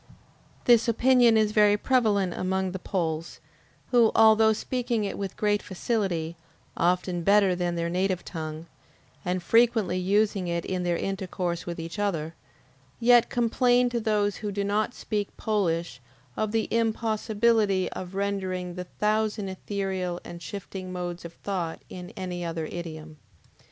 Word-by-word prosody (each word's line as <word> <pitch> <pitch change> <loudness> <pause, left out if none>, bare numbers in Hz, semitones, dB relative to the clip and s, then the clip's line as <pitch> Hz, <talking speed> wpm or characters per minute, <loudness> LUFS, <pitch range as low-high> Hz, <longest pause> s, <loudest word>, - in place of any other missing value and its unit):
This 235 -1 +5
opinion 240 0 +5
is 215 -1 +3
very 210 -1 +5
prevalent 205 -7 +2
among 190 0 -1
the 190 - -5
Poles, 165 -4 -3 0.5
who, 235 -3 +5
although 220 0 +6
speaking 240 0 -1
it 200 - -3
with 195 -1 -5
great 205 -1 +1
facility, 180 -5 -2 0.4
often 180 0 +1
better 200 +1 +4
than 175 -1 -1
their 170 0 -1
native 185 +1 -1
tongue, 155 -1 -6 0.6
and 180 0 -2
frequently 225 -4 +3
using 200 0 +1
it 170 -1 -2
in 185 -1 -2
their 175 -1 0
intercourse 180 -3 -3
with 170 -1 -4
each 165 +5 -6
other, 165 -6 -1 0.7
yet 240 0 +5
complain 245 +1 +3
to 240 - 0
those 210 -3 0
who 210 -1 -4
do 200 0 -2
not 210 +4 0
speak 210 -2 -3
Polish 170 - -1 0.3
of 215 -1 -1
the 225 0 0
impossibility 220 -3 +1
of 185 0 -7
rendering 190 -3 -2
the 180 0 -6
thousand 210 0 -1
ethereal 190 -2 -3
and 170 0 -9
shifting 190 -1 -7
modes 175 -1 -5
of 170 - -8
thought 175 -5 -4
in 180 -1 -8
any 180 -1 -4
other 165 -1 -3
idiom. 160 -2 -7
195 Hz, 145 wpm, -27 LUFS, 175-215 Hz, 0.7 s, although